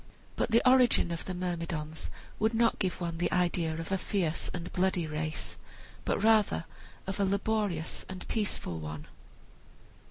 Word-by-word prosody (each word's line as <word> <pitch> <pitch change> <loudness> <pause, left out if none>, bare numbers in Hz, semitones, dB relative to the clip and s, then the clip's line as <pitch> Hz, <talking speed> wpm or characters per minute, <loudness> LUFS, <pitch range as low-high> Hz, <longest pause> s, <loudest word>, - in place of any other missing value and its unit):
But - - 0
the 230 +2 +4
origin 250 -8 +5
of 170 - -3
the 185 - -3
Myrmidons 165 -3 -3 0.3
would 220 +2 +2
not 230 0 +3
give 185 -3 0
one 170 -2 -3
the 175 - +1
idea 175 -3 +1
of 165 +2 -5
a 190 - +1
fierce 180 -5 -1
and 175 0 -5
bloody 180 -2 +2
race, 155 0 -3 0.5
but - - 0
rather 215 -6 +4 0.4
of 190 +1 -4
a - - +4
laborious 200 -4 0
and 185 -1 -7
peaceful 205 - -1
one. 75 -1 -6
180 Hz, 155 wpm, -31 LUFS, 165-205 Hz, 0.5 s, origin